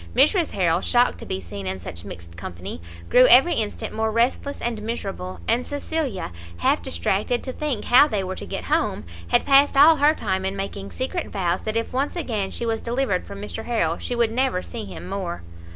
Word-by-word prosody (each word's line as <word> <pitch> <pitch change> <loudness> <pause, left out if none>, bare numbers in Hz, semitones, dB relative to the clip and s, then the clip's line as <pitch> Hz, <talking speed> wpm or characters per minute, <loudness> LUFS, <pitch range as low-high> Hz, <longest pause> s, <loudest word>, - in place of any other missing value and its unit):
Mrs 310 - +3
Harrel, 175 -2 +2
shocked 245 0 +2
to - - -9
be 95 - -2
seen 95 +2 -7
in 95 0 -3
such 85 -1 -8
mixed 85 0 -10
company, 85 0 -7 0.3
grew 255 +1 +6
every 270 +8 +7
instant 215 -6 -3
more 220 0 0
restless 245 +5 0
and 230 -3 -3
miserable; 195 -4 -5
and 235 +2 +2
Cecilia, 285 - -3 0.3
half 85 - +2
distracted 195 - -1
to 260 - -5
think 285 -7 -2
how 265 +4 +7
they 210 -8 -1
were 185 0 -3
to - - -7
get - - -4
home, - - 0 0.2
had - - +2
passed 275 0 +5
all 310 +3 +8
her 295 +2 +4
time 190 -6 -1
in 190 +1 -2
making 195 0 -5
secret 290 +7 -3
vows 180 -2 -1
that 215 +1 -1
if 230 - -3
once 275 +6 -1
again 220 - -2
she 235 - -4
was 225 -1 -1
delivered 235 -6 -1
from 200 - -8
Mr 220 +2 -6
Harrel 170 -9 0
she 245 - -3
would 235 -2 +2
never 250 -6 0
see 225 -3 -6
him - - -8
more. 185 - -4
220 Hz, 205 wpm, -23 LUFS, 185-260 Hz, 0.3 s, all